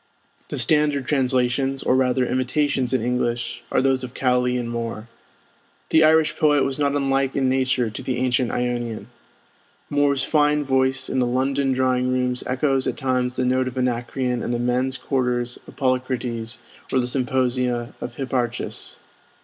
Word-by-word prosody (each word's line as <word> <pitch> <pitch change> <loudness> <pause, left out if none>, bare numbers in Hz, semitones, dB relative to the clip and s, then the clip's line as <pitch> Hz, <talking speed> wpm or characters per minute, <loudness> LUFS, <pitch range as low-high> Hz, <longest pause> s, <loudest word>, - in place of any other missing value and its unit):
The - - -4
standard 150 -3 +2
translations, 135 0 +1
or 130 - +2
rather 130 -1 +2
imitations 130 0 0
in 130 -4 +1
English, 120 0 -1
are - - +2
those 135 -1 +2
of 125 -1 -7
Cowley 125 -1 +1
and 120 -1 -3
Moore. 115 -1 -5 0.8
The 160 - +6
Irish 160 0 +4
poet 150 -3 +3
was 135 +1 -2
not 140 -1 +1
unlike 135 -1 0
in 135 -1 +1
nature 130 -3 +1
to - - -6
the 130 - -2
ancient 125 -1 +1
Ionian. 120 -2 -3 0.8
Moore's 145 -1 +2
fine 150 0 +2
voice 130 -1 +1
in 130 - -1
the 125 - +2
London 135 +2 0
drawing 130 -1 +1
rooms 125 -1 -1
echoes 135 0 +1
at - - -2
times 125 -1 0
the 130 - 0
note 130 +1 +1
of 130 0 -6
Anacreon 125 0 -1
in - - -3
the 120 - 0
men's 125 +2 0
quarters 125 -2 -1
of - - -13
Polycrates 125 -3 -2 0.3
or 130 - +2
the 125 - 0
symposia 125 -1 0
of - - -6
Hipparchus. 125 -3 -3
130 Hz, 160 wpm, -22 LUFS, 125-135 Hz, 0.8 s, The